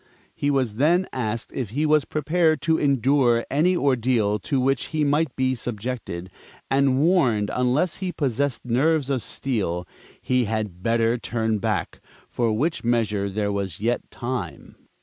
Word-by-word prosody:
He 145 Hz, -, -1 dB
was 130 Hz, -6 st, 0 dB
then 170 Hz, +7 st, +3 dB
asked 115 Hz, -2 st, -3 dB
if 125 Hz, -6 st, -3 dB
he 145 Hz, +8 st, -1 dB
was 150 Hz, -2 st, +3 dB
prepared 155 Hz, +1 st, +1 dB
to 160 Hz, 0 st, +2 dB
endure 135 Hz, -3 st, +2 dB
any 175 Hz, +6 st, +3 dB
ordeal 120 Hz, -7 st, +1 dB
to 135 Hz, +4 st, -1 dB
which 135 Hz, +2 st, +1 dB
he 155 Hz, -1 st, -1 dB
might 145 Hz, 0 st, +1 dB
be 130 Hz, 0 st, +1 dB
subjected, 115 Hz, -6 st, -5 dB, 0.4 s
and 135 Hz, -1 st, +3 dB
warned 135 Hz, -, +2 dB
unless 130 Hz, +7 st, +1 dB
he 185 Hz, -2 st, -3 dB
possessed 140 Hz, -4 st, -1 dB
nerves 140 Hz, +4 st, +1 dB
of 130 Hz, -3 st, 0 dB
steel, 95 Hz, -11 st, -2 dB, 0.3 s
he 125 Hz, -1 st, +1 dB
had 105 Hz, -4 st, -3 dB
better 115 Hz, +2 st, +1 dB
turn 110 Hz, -2 st, -1 dB
back -, -, -2 dB, 0.3 s
for 115 Hz, -2 st, 0 dB
which 150 Hz, +10 st, -1 dB
measure 110 Hz, -4 st, 0 dB
there 100 Hz, +1 st, -1 dB
was 100 Hz, -4 st, -3 dB
yet 120 Hz, +3 st, -1 dB
time. 125 Hz, +1 st, -5 dB
125 Hz, 150 wpm, -24 LUFS, 110-145 Hz, 0.4 s, then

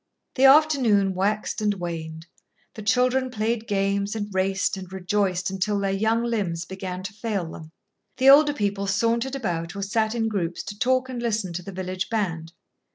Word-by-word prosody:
The 265 Hz, -, +3 dB
afternoon 265 Hz, -9 st, +5 dB
waxed 205 Hz, +4 st, -1 dB
and 210 Hz, -1 st, +1 dB
waned. 165 Hz, -3 st, -6 dB, 0.5 s
The 220 Hz, -, -8 dB
children 255 Hz, +4 st, +2 dB
played 230 Hz, 0 st, -2 dB
games 200 Hz, +1 st, 0 dB
and 205 Hz, -2 st, -4 dB
raced 190 Hz, +1 st, 0 dB
and 190 Hz, -2 st, -9 dB
rejoiced 190 Hz, 0 st, -1 dB
until 195 Hz, +2 st, -1 dB
their 195 Hz, -1 st, 0 dB
young 220 Hz, +4 st, +1 dB
limbs 195 Hz, -8 st, -2 dB
began 185 Hz, -1 st, -6 dB
to 200 Hz, +3 st, -6 dB
fail 205 Hz, -6 st, -3 dB
them. 160 Hz, -1 st, -10 dB, 0.5 s
The 265 Hz, +1 st, +7 dB
older 290 Hz, +1 st, +6 dB
people 200 Hz, -3 st, -1 dB
sauntered 230 Hz, +6 st, 0 dB
about 175 Hz, -8 st, -3 dB
or 200 Hz, -, -3 dB
sat 220 Hz, +2 st, 0 dB
in 225 Hz, -1 st, 0 dB
groups 180 Hz, -6 st, -2 dB
to 205 Hz, +1 st, -8 dB
talk 255 Hz, +1 st, +2 dB
and 250 Hz, -2 st, -5 dB
listen 215 Hz, -6 st, -1 dB
to 175 Hz, -, -4 dB
the 195 Hz, -, -8 dB
village 185 Hz, 0 st, -4 dB
band. 170 Hz, -7 st, -2 dB
200 Hz, 175 wpm, -24 LUFS, 185-230 Hz, 0.5 s, The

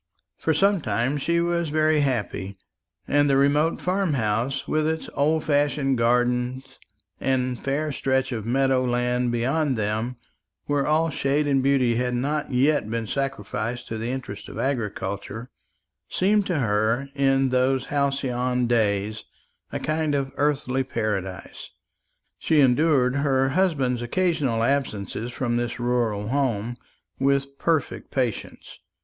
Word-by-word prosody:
For 160 Hz, -, +1 dB
some 195 Hz, +4 st, +3 dB
time 120 Hz, +6 st, 0 dB
she 170 Hz, +4 st, +1 dB
was 170 Hz, -1 st, 0 dB
very 155 Hz, 0 st, +2 dB
happy; 105 Hz, -8 st, -2 dB, 0.5 s
and 145 Hz, 0 st, +3 dB
the 135 Hz, -, +4 dB
remote 145 Hz, +4 st, +2 dB
farm 185 Hz, -2 st, 0 dB
house, 120 Hz, +4 st, -1 dB
with 155 Hz, 0 st, +1 dB
its 160 Hz, 0 st, -3 dB
old 155 Hz, +2 st, +1 dB
fashioned 145 Hz, -3 st, +1 dB
gardens 125 Hz, +2 st, 0 dB, 0.4 s
and 130 Hz, -2 st, -1 dB
fair 145 Hz, +3 st, -1 dB
stretch 130 Hz, -1 st, 0 dB
of 115 Hz, -3 st, -3 dB
meadow 130 Hz, +2 st, +2 dB
land 125 Hz, 0 st, 0 dB
beyond 130 Hz, +3 st, 0 dB
them, 110 Hz, +4 st, -1 dB, 0.5 s
where 145 Hz, -1 st, 0 dB
all 160 Hz, +1 st, +2 dB
shade 140 Hz, +2 st, 0 dB
and 140 Hz, -2 st, +2 dB
beauty 130 Hz, -4 st, +2 dB
had 125 Hz, 0 st, 0 dB
not 145 Hz, +5 st, -1 dB
yet 130 Hz, -2 st, +2 dB
been 115 Hz, 0 st, -2 dB
sacrificed 120 Hz, -2 st, -3 dB
to 110 Hz, -, -4 dB
the 115 Hz, +2 st, -3 dB
interests 125 Hz, -6 st, -5 dB
of -, -, -9 dB
agriculture, 110 Hz, -2 st, -3 dB, 0.6 s
seemed 205 Hz, +2 st, +2 dB
to 175 Hz, -, 0 dB
her 115 Hz, +2 st, +1 dB
in 135 Hz, -1 st, +2 dB
those 130 Hz, +1 st, +1 dB
halcyon 130 Hz, -3 st, 0 dB
days 110 Hz, -2 st, 0 dB, 0.5 s
a -, -, -3 dB
kind 155 Hz, -1 st, 0 dB
of 135 Hz, -1 st, -1 dB
earthly 135 Hz, -3 st, 0 dB
paradise. 100 Hz, -6 st, -4 dB, 0.7 s
She 155 Hz, -, +2 dB
endured 135 Hz, -1 st, +3 dB
her 135 Hz, -2 st, +2 dB
husband's 135 Hz, -7 st, +1 dB
occasional 140 Hz, -4 st, 0 dB
absence 120 Hz, -6 st, -1 dB, 0.2 s
from 120 Hz, -1 st, -1 dB
this 120 Hz, 0 st, -3 dB
rural 115 Hz, -4 st, 0 dB
home 120 Hz, -4 st, -1 dB, 0.4 s
with 140 Hz, 0 st, 0 dB
perfect 165 Hz, -3 st, -1 dB
patience. 125 Hz, -5 st, -3 dB
130 Hz, 135 wpm, -24 LUFS, 120-145 Hz, 0.7 s, the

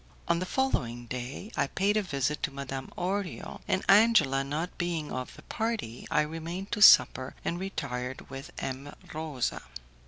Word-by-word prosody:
On 170 Hz, 0 st, +2 dB
the 185 Hz, -, -3 dB
following 120 Hz, -, 0 dB
day 125 Hz, -, -6 dB
I 140 Hz, -, +1 dB
paid 200 Hz, +7 st, +1 dB
a 215 Hz, -, +3 dB
visit 150 Hz, -5 st, -1 dB
to -, -, 0 dB
Madame 135 Hz, -1 st, -5 dB
Orio, 190 Hz, +1 st, -3 dB
and 190 Hz, -, 0 dB
Angela 195 Hz, -11 st, +6 dB
not 155 Hz, +6 st, -3 dB
being 170 Hz, -4 st, -2 dB
of 130 Hz, 0 st, -5 dB
the -, -, -14 dB
party, 220 Hz, -, -3 dB
I 150 Hz, -, +3 dB
remained 165 Hz, +5 st, -5 dB
to 210 Hz, -, -1 dB
supper 130 Hz, -8 st, +7 dB
and 170 Hz, -, -1 dB
retired 130 Hz, -9 st, -4 dB
with 135 Hz, 0 st, -8 dB
M. 135 Hz, +2 st, -5 dB, 0.2 s
Rosa. 155 Hz, -5 st, -2 dB
150 Hz, 160 wpm, -29 LUFS, 135-190 Hz, 0.2 s, supper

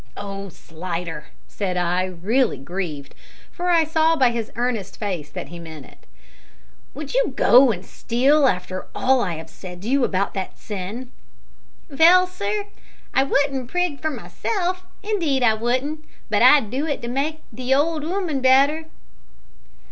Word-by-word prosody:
"Oh, 200 Hz, -1 st, -6 dB
Slidder," 165 Hz, -2 st, -6 dB, 0.2 s
said 185 Hz, -3 st, -3 dB
I, 180 Hz, +1 st, +1 dB
really 195 Hz, +9 st, 0 dB
grieved, 150 Hz, -2 st, -5 dB, 0.4 s
for 355 Hz, 0 st, -3 dB
I 335 Hz, -2 st, +5 dB
saw 320 Hz, +1 st, +2 dB
by 260 Hz, -5 st, +4 dB
his 230 Hz, -2 st, -4 dB
earnest 230 Hz, -5 st, -2 dB
face 180 Hz, -9 st, -4 dB
that -, -, -7 dB
he 175 Hz, -, -9 dB
meant 160 Hz, -4 st, -10 dB
it, -, -, -20 dB, 0.9 s
"would 300 Hz, -2 st, -6 dB
you -, -, +1 dB
go 255 Hz, 0 st, +6 dB
and 185 Hz, -3 st, -6 dB
steal 270 Hz, +5 st, +2 dB
after 185 Hz, -3 st, -2 dB
all 260 Hz, -1 st, +3 dB
I 180 Hz, -7 st, -1 dB
have 160 Hz, 0 st, -8 dB
said 180 Hz, +1 st, -10 dB
to -, -, -5 dB
you 270 Hz, +1 st, +2 dB
about 195 Hz, -3 st, 0 dB
that 190 Hz, -1 st, -5 dB
sin?" 210 Hz, +5 st, -6 dB, 0.8 s
"Vell, 340 Hz, +5 st, +6 dB
sir, 405 Hz, +3 st, -3 dB, 0.5 s
I -, -, +4 dB
wouldn't 275 Hz, -2 st, 0 dB
prig 355 Hz, -4 st, -1 dB
for 315 Hz, -, 0 dB
myself 370 Hz, +3 st, -3 dB, 0.2 s
indeed 335 Hz, -11 st, 0 dB
I 225 Hz, -2 st, +5 dB
wouldn't 255 Hz, +7 st, -1 dB, 0.3 s
but -, -, +2 dB
I'd 275 Hz, -8 st, +6 dB
do 275 Hz, +5 st, -1 dB
it 290 Hz, -5 st, -3 dB
to -, -, -3 dB
make 290 Hz, +5 st, -2 dB
the 255 Hz, +3 st, +1 dB
old 305 Hz, +2 st, +1 dB
'ooman 335 Hz, -4 st, -2 dB
better." 275 Hz, +5 st, +4 dB
255 Hz, 155 wpm, -22 LUFS, 190-310 Hz, 0.9 s, go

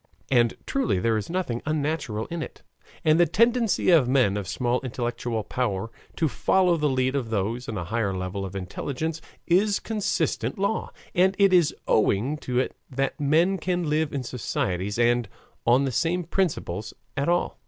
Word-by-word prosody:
And 120 Hz, -3 st, +4 dB
truly 270 Hz, -, 0 dB
there 115 Hz, +4 st, +1 dB
is 110 Hz, -, -3 dB
nothing 170 Hz, -10 st, -2 dB
unnatural 150 Hz, -8 st, -1 dB
in 170 Hz, -1 st, -3 dB
it, -, -, -8 dB, 0.4 s
and 155 Hz, +1 st, +5 dB
the 175 Hz, -, +5 dB
tendency 230 Hz, +2 st, +3 dB
of 150 Hz, -8 st, +5 dB
men 125 Hz, -7 st, +3 dB
of 100 Hz, -2 st, -3 dB
small 125 Hz, +4 st, 0 dB
intellectual 120 Hz, -3 st, -3 dB
power 110 Hz, -3 st, -2 dB, 0.2 s
to 160 Hz, -, +1 dB
follow 180 Hz, +4 st, +2 dB
the 150 Hz, -2 st, +1 dB
lead 130 Hz, 0 st, +1 dB
of 130 Hz, -5 st, -2 dB
those 110 Hz, +4 st, -2 dB
on 110 Hz, -, -3 dB
a 90 Hz, -, -2 dB
higher 105 Hz, +1 st, -1 dB
level 95 Hz, +1 st, -3 dB
of 95 Hz, 0 st, -6 dB
intelligence 140 Hz, -, -4 dB, 0.2 s
is 200 Hz, +4 st, +3 dB
a -, -, -9 dB
constant 165 Hz, -, -1 dB
law, 200 Hz, +3 st, -1 dB, 0.2 s
and 190 Hz, +1 st, +3 dB
it 200 Hz, -2 st, +5 dB
is 175 Hz, -4 st, +4 dB
owing 110 Hz, +7 st, +2 dB
to 125 Hz, -4 st, -3 dB
it 130 Hz, -, 0 dB
that 135 Hz, +3 st, -2 dB
men 165 Hz, +7 st, +3 dB
can 175 Hz, -3 st, -1 dB
live 155 Hz, 0 st, +1 dB
in 140 Hz, -2 st, -3 dB
societies 105 Hz, -5 st, -2 dB
and 120 Hz, -2 st, +2 dB, 0.4 s
on 125 Hz, +4 st, +5 dB
the 135 Hz, -, -1 dB
same 175 Hz, +7 st, 0 dB
principles 145 Hz, -, -2 dB, 0.2 s
at 140 Hz, +3 st, 0 dB
all. 175 Hz, +1 st, 0 dB
135 Hz, 175 wpm, -25 LUFS, 115-170 Hz, 0.4 s, and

